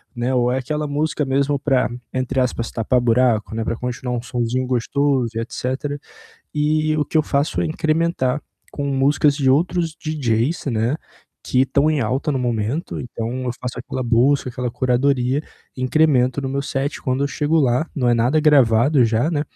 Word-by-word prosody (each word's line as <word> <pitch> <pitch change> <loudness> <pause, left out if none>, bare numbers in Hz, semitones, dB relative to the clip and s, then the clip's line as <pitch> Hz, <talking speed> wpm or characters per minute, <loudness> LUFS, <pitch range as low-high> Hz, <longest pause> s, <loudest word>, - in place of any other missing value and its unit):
né. 120 +2 -1
Ou 125 0 +2
é 130 - 0
aquela 150 +4 -3
música 150 +1 -1
mesmo 140 +2 +1
para, 130 -5 +1 0.2
entre 130 +1 -1
aspas, 120 -2 -1
"tapar 120 +2 +1
buraco", 115 -2 +2
né, 115 - -1
pra 115 - -2
continuar 125 +1 -4
um - - -3
sonzinho 125 +1 -2
gostoso 130 0 +1
e - - -1
etcétera. 130 +5 -3 0.6
E 155 +1 +1
o 150 - +1
que 160 - 0
eu 155 - +4
faço 140 0 0
é - - +1
incrementar 155 -3 0 0.3
com 145 - -3
músicas 140 +1 +2
de 135 -3 +2
outros 165 +3 +1
DJs, 145 -3 -1
né, 115 +6 0 0.5
que 130 - +2
estão 140 +3 +2
em 150 - +1
alta 130 +6 -1
no 135 - -1
momento. 120 +5 -2
Então 115 -2 -5 0.2
eu 125 - -1
faço 125 -1 -5
aquela 125 +1 -5
busca, 125 +4 +2
aquela 125 0 -3
curadoria, 130 +2 +1 0.3
incremento 130 -1 +2
no 135 - -3
meu 140 +1 -2
set. 140 +1 -3
Quando 130 +1 0
eu - - -1
chego 150 +2 0
lá, 130 +2 +2
não 125 -4 +1
é 120 - +4
nada 120 +6 +2
gravado 135 -2 +4
já, 115 +6 +1
né, 150 -3 0
130 Hz, 180 wpm, -20 LUFS, 125-145 Hz, 0.6 s, eu